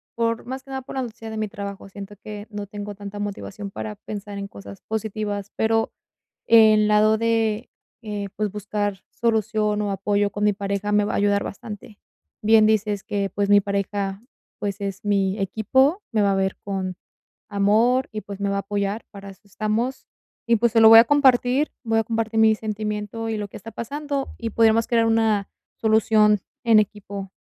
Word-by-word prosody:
por 230 0 -1
más 260 +1 -6
que - - -19
nada, 265 0 -3
por - - -9
la 265 - 0
noticia 230 -1 -8
de 220 - -5
mi 215 0 -1
trabajo, 200 -1 -7
siento 200 +1 -9
que 205 +1 -8
no 205 -1 -5
tengo 205 +1 -6
tanta 200 +1 -8
motivación 205 0 -5
para 210 +1 -6
pensar 205 0 -7
en 200 0 -5
cosas 100 - -11
positivas. 210 -2 -3
Pero 225 0 +1 0.5
el 215 -2 +6
lado 215 +1 +4
de, 225 0 0 0.3
eh, 205 -2 -4
pues, 210 -1 -1
buscar 205 -1 -3
solución 215 -2 0
o 205 - -1
apoyo 200 +1 0
con 205 0 -2
mi 210 - +4
pareja, 200 +1 -2
me 210 0 +4
va - - -2
a - - +1
ayudar 200 0 +2
bastante. 210 +1 -8 0.4
Bien 220 0 +6
dices 210 -2 +1
que, 200 -1 -1
pues, 200 +2 -1
mi 205 0 +7
pareja, 200 0 -2 0.4
pues, 205 0 -3
es 200 0 -5
mi 200 -2 +1
equipo. 260 - +2
Me 215 -2 +2
va 200 -1 +3
a - - +1
ver 190 0 0
con 190 -2 -3 0.5
amor 220 +6 +2
y, 215 - -4
pues, 200 -1 -9
me 200 - 0
va 200 - -1
a - - 0
apoyar, 200 +2 -2
para 200 -1 -9
eso 195 - -16
estamos, 215 +5 -2 0.4
y 235 0 +4
pues, 235 +1 +1
se 230 - +4
lo 220 - +9
voy 225 0 +11
a - - +5
compartir, 265 0 +3
voy 225 -1 +1
a - - -2
compartir 225 0 -1
mi 220 0 +6
sentimiento 215 +1 -4
y 220 - -1
lo 205 - -3
que - - -10
está 225 +3 -10
pasando, 280 +5 -4
y 230 -1 -3
podríamos 225 +1 +3
crear 230 -1 +3
una 220 -3 +2 0.3
solución 215 -1 +4 0.2
en 225 -2 +6
equipo. 200 -2 -5
210 Hz, 190 wpm, -23 LUFS, 200-225 Hz, 0.5 s, voy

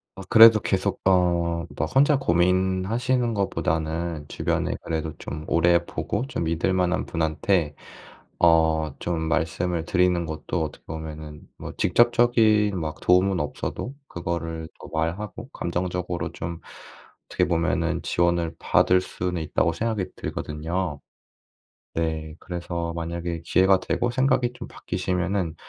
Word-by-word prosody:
어. 95 - -8
그래도 110 -1 +9
계속 95 -2 -1
어 90 -2 +4 0.4
뭐 80 - 0
혼자 140 - +4
고민하시는 95 +6 +1
것보다는 85 -4 -2
주변에 - - -1
그래도 80 -1 -2
좀 75 +1 -6
오래 85 +1 +3
보고 85 - -3
좀 85 - -3
믿을 85 +3 0
만한 90 0 +1
분한테 80 0 0 0.6
어 80 -3 +3
좀 85 -2 -2
말씀을 85 +1 0
드리는 90 -2 +2
것도 80 +2 -3
어떻게 75 - -7
보면은 80 -1 -7 0.2
뭐 - - -7
직접적인 110 -2 +3
막 75 -1 -4
도움은 90 +1 +3
없어도 120 - -4
그거를 85 -2 -4
또 - - -10
말하고 100 - -3
감정적으로 90 -1 -3
좀 85 -1 -6 0.7
어떻게 - - +1
보면은 85 -1 0
지원을 85 -1 +1
받을 90 0 +3
수는 90 -2 -3
있다고 85 +2 +1
생각이 110 0 -1
들거든요. 80 0 -4 0.9
네. 80 -1 -2
그래서 85 -1 -4
만약에 85 0 -4
기회가 95 +1 +4
되고 120 +5 -1
생각이 130 -1 +1
좀 - - -9
바뀌시면은 90 -1 -2
85 Hz, 285 characters per minute, -24 LUFS, 80-95 Hz, 0.9 s, 그래도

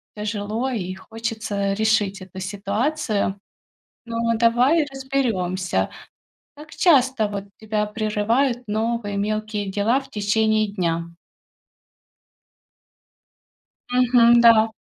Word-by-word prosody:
тяжело 210 +4 -3
и 185 -5 -4
хочется 215 -1 -3
решить 205 -2 +1
эту 185 0 -10
ситуацию. 205 +3 -1 0.7
Но, 230 -1 -6 0.2
давай 245 +7 +3
разберёмся. 225 -10 -1 0.7
Как 300 +1 -13
часто, 265 - +3
вот, 200 -1 -5 0.2
тебя 215 -1 -1
прерывают 225 +4 0
новые 220 -1 -2
мелкие 215 0 -2
дела 210 +7 +1
в 270 0 -14
течение 215 0 +1
дня? 170 -3 -1 2.8
Мгм, 240 -1 +5
да. 225 -1 +6
220 Hz, 90 wpm, -22 LUFS, 205-240 Hz, 2.8 s, да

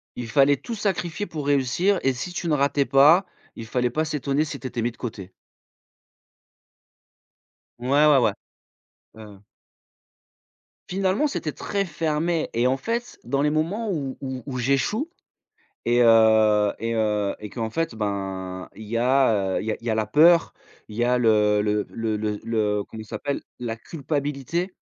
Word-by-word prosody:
Il 120 -2 -6
fallait 140 +3 +4
tout 230 - -6
sacrifier 190 -3 -2
pour 150 -7 -6
réussir 145 +8 +2
et 135 0 +2
si 175 +9 -6
tu 175 - -4
ne 155 - +1
ratais 140 0 +2
pas, 145 +8 +6 0.3
il 115 - -7
fallait 125 +1 0
pas 155 +6 -1
s'étonner 150 0 -1
si 145 -2 -6
tu 130 - -5
étais 120 -2 -4
mis 120 - 0
de - - -22
côté. 100 -6 -7 2.5
Ouais, 125 +1 -5 0.2
ouais 150 -2 +6
ouais. 120 - +2 0.8
Ouais 110 -1 -11
ouais. 105 -1 -15 1.5
Finalement, 195 +9 +1
c'était 155 - -4
très 200 -1 -2
fermé 160 0 -1
et 120 +2 +2
en 130 - +2
fait, 230 - -4
dans 140 0 -1
les 150 - +3
moments 175 +9 -1
où 140 -8 -3
où 130 -2 -5
où 130 -2 -5
j'échoue 140 - 0 0.8
et 120 +1 +3
heu 110 -2 +5
et 115 0 -2
heu, 105 -2 0
et 105 - -7
qu'en 110 +1 -4
fait 165 -1 -2
ben, 95 -3 -4
il 110 - -10
y 115 +2 -2
a, 115 -6 +2
heu, - - -1
il - - -7
y 110 - 0
a - - -3
il 115 - -12
y - - -1
a - - +1
la 110 -1 0
peur, 165 +7 +5 0.4
il 105 - -10
y 120 - +1
a 125 +1 +2
le 105 -3 +3
le 105 0 0
le 110 -2 -2
le 105 -1 -2
le 105 -2 0
comment 110 - -10
il 110 - -9
s'appelle? 140 +6 -3 0.2
La 115 -2 -4
culpabilité. 145 +5 -3
130 Hz, 180 wpm, -24 LUFS, 110-155 Hz, 2.5 s, pas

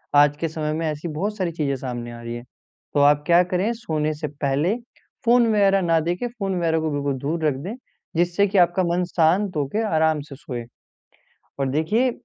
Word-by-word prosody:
आज 145 0 +5
के 165 - -1
समय 155 -1 -3
में 165 +1 -2
ऐसी 155 +2 -3
बहुत 195 +7 -3
सारी 185 -4 -1
चीज़ें 150 -4 -1
सामने 120 -2 -5
आ 120 0 -9
रही 115 0 -5
है। 120 - -7 0.5
तो 145 - +2
आप 145 +1 +5
क्या 175 +1 +6
करें, 180 +5 0
सोने 155 -10 -2
से 150 +1 -4
पहले 145 +6 0 0.5
फोन 240 0 +5
वग़ैरह 195 -2 +4
ना 165 -2 +3
देखे 175 +8 -1
फोन 195 -2 -1
वग़ैरह 165 -1 +1
को 160 0 -1
बिल्कुल 145 -1 -1
दूर 155 +4 -2
रख 150 - +3
दें 195 +5 -4 0.4
जिससे 175 +4 +2
कि 200 +1 -1
आपका 175 +1 +4
मन 175 +1 +1
शांत 180 +3 +2
होके 150 +10 -1
आराम 160 -1 +3
से 140 - -8
सोए। 125 -3 -6 1.0
और 135 - +1
देखिए 210 - +2
160 Hz, 200 wpm, -23 LUFS, 145-185 Hz, 1.0 s, क्या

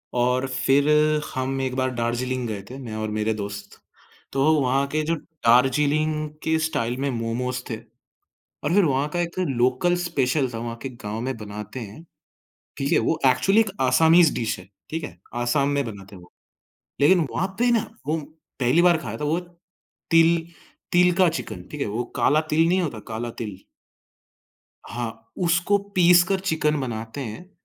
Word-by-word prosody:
और 125 +2 +1
फिर 135 +3 +2 0.4
हम 130 0 -2
1 130 -1 -2
बार 130 0 0
दार्जिलिंग 120 +1 -1
गए 105 -3 -4
थे, 130 - -8
मैं 120 -5 -7
और 110 0 -3
मेरे 110 +1 0
दोस्त, 100 -1 -7 0.5
तो 135 +3 +3
वहाँ 135 +2 +2
के 155 +2 -1
जो 165 +2 0 0.3
दार्जिलिंग 150 +5 +3
के 160 0 +2
स्टाइल 125 -7 -1
में 140 - 0
मोमोज़ 125 +2 -2
थे। 115 - -2 0.9
और 150 - 0
फिर 200 -1 +5
वहाँ 140 -1 +1
का 175 - +1
एक 170 +1 -3
लोकल 130 +7 +2
स्पेशल 145 -6 0
था, - - -3
वहाँ 115 0 -5
के 135 - -3
गाँव 110 -3 -6
में 130 +1 -3
बनाते 105 +2 -7
हैं, 110 +8 -9 0.7
ठीक 140 +1 -1
है? - - +5
वो 160 - +1
एक्चुअली 195 - +4
एक 215 - +1
असामीज़ 160 +6 +5
डिश 115 -4 -2
है, 90 +1 -13 0.2
ठीक 160 0 -3
है? 85 - -8 0.2
आसाम 130 +4 +1
में 140 -1 0
बनाते 100 -3 -9
हैं 90 - -13
वो। 90 - -19 0.7
लेकिन 160 +3 +5
वहाँ 185 - -1
पे 245 +1 +3
ना 230 -2 +1 0.2
वो 155 +2 0 0.4
पहली 130 +7 +4
बार 175 -1 +5
खाया 115 -7 -6
था, - - -3
वो 160 +4 +1 0.7
तिल 165 0 +4 0.5
तिल 180 0 +5
का 185 -2 +6
चिकन, 165 - -5
ठीक 150 - -7
है? - - 0
वो 110 +4 -2
काला 150 +2 +3
तिल 160 +2 +4
नहीं 185 +2 +3
होता, 140 -10 -3
काला 115 +1 -4
तिल? 105 -5 -5 1.3
हाँ, 115 -1 -6
उसको 175 +4 +3 0.2
पीस 175 -1 +7
कर 195 -1 +1
चिकन 160 -5 0
बनाते 115 +1 -5
हैं 130 +9 -7
135 Hz, 175 wpm, -24 LUFS, 115-160 Hz, 1.3 s, पीस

